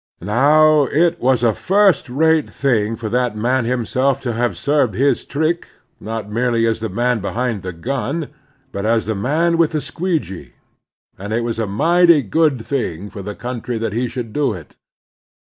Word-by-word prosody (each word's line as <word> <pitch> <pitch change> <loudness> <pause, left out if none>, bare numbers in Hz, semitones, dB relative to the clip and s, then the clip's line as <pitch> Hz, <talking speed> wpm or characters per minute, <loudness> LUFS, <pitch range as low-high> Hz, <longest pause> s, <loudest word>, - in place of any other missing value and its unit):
Now, 145 +8 +4
it 170 +5 +1
was 125 -1 +2
a 115 -2 +3
first 195 - +2
rate 160 +4 +2
thing 115 -5 0
for 115 0 -6
that 120 -1 0
man 120 +3 0
him 120 -1 -1
self 135 +3 +1
to 120 -3 -3
have 120 +1 -1
served 140 -8 +1
his 140 +5 +1
trick, 160 +4 -1 0.3
not 110 -1 -5
merely 115 +1 0
as 115 0 0
the 110 0 -3
man 120 +4 0
behind 115 +1 -2
the 95 - -5
gun, 135 - -3 0.4
but 100 - -4
as 110 +1 +1
the 110 - -1
man 160 +11 0
with 165 -1 +2
the 155 - 0
squeegee; 150 - -4 0.7
and 100 +2 -6
it 115 +2 0
was 115 -1 -3
a 110 - -1
mighty 165 - +4
good 140 +1 +1
thing 105 - -3
for 100 - -8
the 105 +2 -6
country 120 -1 -5
that 110 -2 -3
he 120 +3 -1
should 120 -3 -6
do 145 -6 0
it. 85 -6 -11
125 Hz, 180 wpm, -19 LUFS, 110-150 Hz, 0.7 s, Now